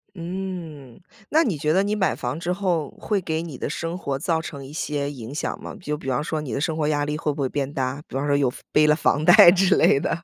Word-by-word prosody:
嗯， 170 Hz, -7 st, -6 dB, 0.3 s
那 315 Hz, -, +4 dB
你 200 Hz, -, -1 dB
觉 150 Hz, +2 st, 0 dB
得 190 Hz, +4 st, +3 dB
你 205 Hz, +1 st, 0 dB
买 195 Hz, -3 st, +1 dB
房 150 Hz, -, -4 dB
之 175 Hz, +1 st, -3 dB
后 180 Hz, -6 st, -1 dB
会 205 Hz, -3 st, -1 dB
给 160 Hz, -2 st, -2 dB
你 155 Hz, -6 st, -7 dB
的 -, -, -3 dB
生 165 Hz, +3 st, -4 dB
活 140 Hz, -7 st, -3 dB
造 160 Hz, +1 st, 0 dB
成 140 Hz, -4 st, -8 dB
一 135 Hz, -, -11 dB
些 145 Hz, -2 st, -2 dB
影 130 Hz, -3 st, -8 dB
响 150 Hz, -, -3 dB
吗？ -, -, -7 dB
就 150 Hz, -2 st, -3 dB
比 135 Hz, -, -6 dB
方 125 Hz, +1 st, 0 dB
说 155 Hz, 0 st, -3 dB
你 135 Hz, -7 st, -5 dB
的 -, -, -1 dB
生 160 Hz, +2 st, -1 dB
活 155 Hz, -1 st, -1 dB
压 145 Hz, -1 st, +1 dB
力 150 Hz, +1 st, -2 dB
会 150 Hz, -1 st, -1 dB
不 145 Hz, -, -5 dB
会 135 Hz, -, +1 dB
变 140 Hz, +1 st, -3 dB
大？ 130 Hz, +1 st, -2 dB
比 -, -, -9 dB
方 140 Hz, +2 st, -1 dB
说 145 Hz, -, +2 dB
又 140 Hz, -3 st, +2 dB, 0.2 s
背 150 Hz, -, +5 dB
了 150 Hz, -, +5 dB
房 150 Hz, -1 st, +1 dB
贷 175 Hz, +3 st, +9 dB
之 190 Hz, +1 st, +3 dB
类 -, -, +5 dB
的。 165 Hz, -, -1 dB
155 Hz, 285 characters per minute, -23 LUFS, 140-175 Hz, 0.3 s, 贷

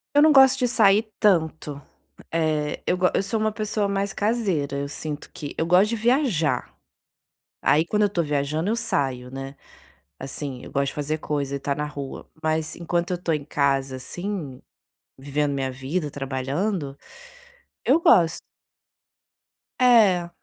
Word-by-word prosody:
Eu 290 Hz, -, +7 dB
não 310 Hz, -, +7 dB
gosto 265 Hz, -2 st, +7 dB
de 250 Hz, -, +2 dB
sair 215 Hz, -2 st, +4 dB
tanto. 160 Hz, -7 st, +1 dB, 0.5 s
Eh, 155 Hz, -2 st, 0 dB
eu 180 Hz, -, +2 dB
gos 180 Hz, 0 st, +2 dB
eu -, -, +2 dB
sou 210 Hz, +3 st, -1 dB
uma 215 Hz, 0 st, +1 dB
pessoa 210 Hz, -1 st, -1 dB
mais 200 Hz, 0 st, -1 dB
caseira, 195 Hz, -, -1 dB
eu 140 Hz, 0 st, -3 dB
sinto 150 Hz, 0 st, -6 dB
que 145 Hz, -, -7 dB
eu 160 Hz, -, 0 dB
gosto 180 Hz, +5 st, +4 dB
de 230 Hz, -, -1 dB
viajar. 220 Hz, -, +1 dB, 0.9 s
Aí 155 Hz, +2 st, +3 dB
quando 210 Hz, +4 st, +1 dB
eu -, -, +5 dB
estou 185 Hz, -4 st, -1 dB
viajando, 150 Hz, +4 st, -1 dB
eu 225 Hz, -, +1 dB
saio, 135 Hz, -, -1 dB
né. 135 Hz, +1 st, -7 dB, 0.6 s
Assim, 135 Hz, -1 st, -5 dB
eu -, -, -10 dB
gosto 140 Hz, 0 st, 0 dB
de -, -, -5 dB
fazer 150 Hz, +1 st, -2 dB
coisa 145 Hz, -2 st, -3 dB
e -, -, -2 dB
estar 140 Hz, 0 st, -2 dB
na 150 Hz, -, -2 dB
rua, 145 Hz, -2 st, -7 dB, 0.2 s
mas 155 Hz, 0 st, -1 dB
enquanto 170 Hz, +1 st, -2 dB
eu 180 Hz, -, 0 dB
estou 170 Hz, -2 st, -1 dB
em 150 Hz, -2 st, -3 dB
casa, 135 Hz, -2 st, 0 dB
assim, 165 Hz, -1 st, -5 dB, 0.6 s
vivendo 145 Hz, +2 st, -1 dB
minha 135 Hz, -1 st, -2 dB
vida, 145 Hz, +5 st, -3 dB
trabalhando, 140 Hz, +4 st, -3 dB, 0.9 s
eu -, -, +4 dB
gosto. 170 Hz, -, +4 dB, 1.4 s
É, 210 Hz, -9 st, +5 dB
160 Hz, 160 wpm, -24 LUFS, 140-200 Hz, 1.4 s, Eu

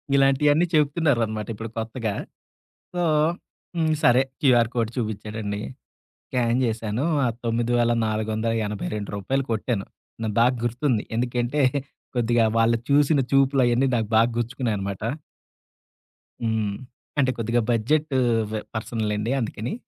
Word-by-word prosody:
ఇలాంటియన్నీ 145 Hz, +4 st, +4 dB
చెప్తున్నారనమాట 140 Hz, -8 st, +1 dB
ఇప్పుడు 115 Hz, +1 st, -6 dB
కొత్తగా. 115 Hz, -1 st, -2 dB, 0.8 s
సో -, -, -1 dB, 0.8 s
హ్మ్. 160 Hz, -2 st, +2 dB
సరే. 125 Hz, +2 st, +6 dB, 0.2 s
QR 120 Hz, -5 st, +4 dB
code 115 Hz, -2 st, 0 dB
చూపించాడండి. 105 Hz, -2 st, -3 dB, 0.7 s
స్కాన్ 120 Hz, -1 st, +1 dB
చేశాను. 115 Hz, +2 st, -2 dB, 0.2 s
ఆ -, -, +3 dB, 0.2 s
9482 110 Hz, -1 st, 0 dB
కొట్టాను. 110 Hz, -2 st, -1 dB, 0.4 s
నాకు 110 Hz, -2 st, -1 dB
బా 120 Hz, -, +6 dB, 0.2 s
గుర్తుంది. 120 Hz, -1 st, 0 dB
ఎందుకంటే 120 Hz, +4 st, 0 dB, 0.5 s
కొద్దిగా 120 Hz, -1 st, +3 dB
వాళ్ళు 115 Hz, 0 st, +4 dB
చూసిన 145 Hz, +1 st, +4 dB
చూపులువన్నీ 135 Hz, -2 st, +3 dB
నాకు 110 Hz, -2 st, 0 dB
బాగా 115 Hz, +2 st, +5 dB
గుర్చ్చుకున్నాయన్నమాట. 110 Hz, -6 st, -2 dB, 1.4 s
హ్మ్. 110 Hz, -3 st, 0 dB, 0.5 s
అంటే 130 Hz, -2 st, +3 dB
కొద్దిగా 115 Hz, +1 st, +1 dB
బడ్జెట్ 150 Hz, +7 st, +1 dB, 0.4 s
వె 110 Hz, -, -1 dB
పర్సన్లెండి 110 Hz, 0 st, -2 dB
అందుకని. 115 Hz, +1 st, -3 dB
115 Hz, 100 wpm, -24 LUFS, 110-130 Hz, 1.4 s, సరే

